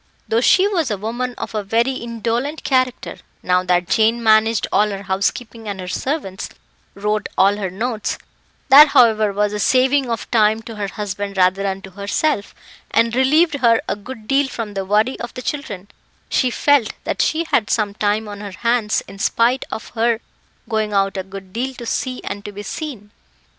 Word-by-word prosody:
Though 225 Hz, +1 st, +1 dB
she 375 Hz, +9 st, +5 dB
was 340 Hz, -9 st, 0 dB
a 210 Hz, -, -1 dB
woman 240 Hz, +4 st, -3 dB
of -, -, -6 dB
a 215 Hz, -, -1 dB
very 230 Hz, +6 st, +1 dB
indolent 235 Hz, +4 st, -3 dB
character, 255 Hz, -2 st, 0 dB, 0.3 s
now 180 Hz, 0 st, +2 dB
that 180 Hz, -1 st, +1 dB
Jane 225 Hz, +5 st, +2 dB
managed 220 Hz, 0 st, +4 dB
all 210 Hz, +1 st, +3 dB
her 200 Hz, -1 st, -5 dB
housekeeping 215 Hz, +4 st, -2 dB
and 200 Hz, -2 st, -4 dB
her 180 Hz, -, -6 dB
servants, 200 Hz, -, -3 dB, 0.5 s
wrote 210 Hz, +1 st, -1 dB
all 200 Hz, +2 st, +4 dB
her 195 Hz, -3 st, -3 dB
notes 220 Hz, +3 st, -3 dB, 0.5 s
that, 290 Hz, +3 st, +10 dB
however, 220 Hz, -6 st, +4 dB
was 205 Hz, +1 st, 0 dB
a 210 Hz, -, -3 dB
saving 260 Hz, +3 st, +3 dB
of 230 Hz, -1 st, -4 dB
time 220 Hz, -1 st, +3 dB
to 225 Hz, 0 st, -8 dB
her 205 Hz, -1 st, -2 dB
husband 200 Hz, 0 st, -5 dB
rather 185 Hz, +1 st, +3 dB
than 195 Hz, 0 st, -3 dB
to 190 Hz, -, -10 dB
herself 200 Hz, +5 st, -1 dB, 0.3 s
and 230 Hz, 0 st, +2 dB
relieved 285 Hz, +4 st, +3 dB
her 230 Hz, -3 st, +4 dB
a -, -, -1 dB
good 215 Hz, +1 st, -10 dB
deal 275 Hz, 0 st, +2 dB
from 225 Hz, -5 st, -5 dB
the 195 Hz, -1 st, -3 dB
worry 215 Hz, +6 st, +1 dB
of 240 Hz, -, -7 dB
the 255 Hz, -, -5 dB
children, 205 Hz, -11 st, -5 dB, 0.4 s
she 255 Hz, -, +2 dB
felt 275 Hz, -2 st, +2 dB
that -, -, -1 dB
she 325 Hz, +1 st, +1 dB
had 215 Hz, -, +2 dB
some 210 Hz, -3 st, 0 dB
time 210 Hz, +1 st, 0 dB
on 205 Hz, -1 st, -7 dB
her 205 Hz, -2 st, -7 dB
hands, 235 Hz, -2 st, +1 dB
in 195 Hz, -, -12 dB
spite 235 Hz, +5 st, +1 dB
of 220 Hz, -, -6 dB
her 230 Hz, 0 st, +1 dB, 0.5 s
going 215 Hz, -2 st, -1 dB
out 195 Hz, -1 st, +1 dB
a 190 Hz, -, -1 dB
good 190 Hz, 0 st, -11 dB
deal 260 Hz, +3 st, -3 dB
to 240 Hz, -, -8 dB
see 255 Hz, +2 st, -2 dB
and 200 Hz, +1 st, -5 dB
to 205 Hz, -, -7 dB
be 205 Hz, +1 st, -8 dB
seen. 220 Hz, -4 st, -6 dB
220 Hz, 190 wpm, -19 LUFS, 200-250 Hz, 0.5 s, that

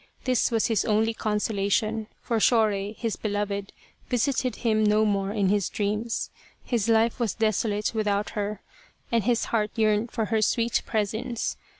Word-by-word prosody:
This 255 Hz, -3 st, +2 dB
was 225 Hz, -2 st, +1 dB
his 225 Hz, -4 st, +1 dB
only 220 Hz, +1 st, +2 dB
consolation, 215 Hz, 0 st, 0 dB, 0.2 s
for 230 Hz, -2 st, 0 dB
Shorei, 210 Hz, -3 st, +2 dB
his 225 Hz, -1 st, -3 dB
beloved, 205 Hz, -1 st, -2 dB, 0.4 s
visited 250 Hz, -1 st, 0 dB
him 220 Hz, -2 st, +1 dB
no 210 Hz, +1 st, +4 dB
more 200 Hz, -1 st, 0 dB
in 205 Hz, -3 st, +1 dB
his 205 Hz, -2 st, +1 dB
dreams. 215 Hz, +3 st, -2 dB, 0.3 s
His 230 Hz, -3 st, -1 dB
life 225 Hz, +2 st, +3 dB
was 230 Hz, -4 st, 0 dB
desolate 215 Hz, -1 st, 0 dB
without 210 Hz, -2 st, 0 dB
her 210 Hz, -1 st, -3 dB, 0.5 s
and 230 Hz, -4 st, +1 dB
his 240 Hz, -1 st, +2 dB
heart 215 Hz, -2 st, +2 dB
yearned 215 Hz, 0 st, +2 dB
for 225 Hz, -2 st, -2 dB
her 220 Hz, -, +3 dB
sweet 230 Hz, +2 st, +1 dB
presence. 220 Hz, +2 st, -2 dB
215 Hz, 155 wpm, -26 LUFS, 205-230 Hz, 0.5 s, no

